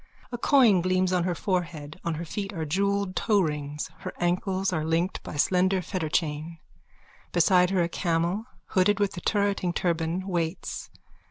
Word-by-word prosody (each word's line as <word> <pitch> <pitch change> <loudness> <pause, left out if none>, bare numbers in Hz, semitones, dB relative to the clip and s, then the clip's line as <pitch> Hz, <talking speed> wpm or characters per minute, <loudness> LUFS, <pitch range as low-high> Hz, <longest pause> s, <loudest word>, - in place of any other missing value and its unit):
A 240 - -3
coin 235 -9 +5
gleams 185 +1 +1
on 180 -1 +2
her 180 -1 0
forehead. 170 -5 -3
On 170 -1 -1
her 170 +2 -5
feet 195 +4 -4
are 160 -3 -3
jewelled 200 +3 0
toerings. 150 -8 0
Her - - -5
ankles 185 +2 0
are 155 -3 0
linked 165 +3 0
by - - -8
a - - -5
slender 185 +5 +3
fetterchain. 160 -2 -2 0.7
Beside 180 +1 +4
her 185 -2 +2
a - - +1
camel, 170 +4 -1 0.2
hooded 195 +1 +3
with 205 -1 0
a - - -4
turreting 200 -4 0
turban, 170 +2 -1
waits. 170 -1 -3
180 Hz, 160 wpm, -27 LUFS, 165-195 Hz, 0.7 s, coin